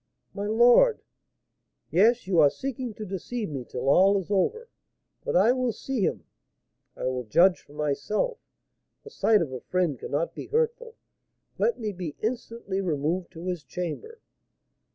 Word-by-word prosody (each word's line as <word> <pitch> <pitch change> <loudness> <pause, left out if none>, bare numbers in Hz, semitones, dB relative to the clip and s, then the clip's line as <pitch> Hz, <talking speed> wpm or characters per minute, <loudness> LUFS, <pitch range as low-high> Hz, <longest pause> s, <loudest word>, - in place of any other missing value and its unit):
"My 200 0 -4
lord 240 - +5 0.4
" - - -53 0.3
"Yes, 225 +7 +4
you 185 -3 +2
are 145 -2 +7
seeking 255 - -5
to 215 - -6
deceive 205 +3 -4
me 135 -3 -4
till 125 +2 -5
all 190 +8 +5
is 195 +1 -5
over. 450 - 0 0.6
But - - -2
I 200 +7 +5
will 255 -1 0
see 260 +1 -4
him, - - -1 0.7
I - - -6
will 130 -1 -1
judge 175 - +4
for 145 - -19
myself; 150 - -1 0.6
the 445 - -12
sight 215 - +3
of 145 - -6
a 130 - -6
friend 175 -8 -1
cannot 150 +4 -2
be - - -8
hurtful. 470 +1 -1 0.6
Let 475 - +1
me 215 -2 -2
be 175 -6 -6
instantly 225 -3 -3
removed 170 +1 -1
to 165 +1 -9
his 180 -4 -3
chamber." 180 - -6
195 Hz, 160 wpm, -26 LUFS, 165-245 Hz, 0.7 s, are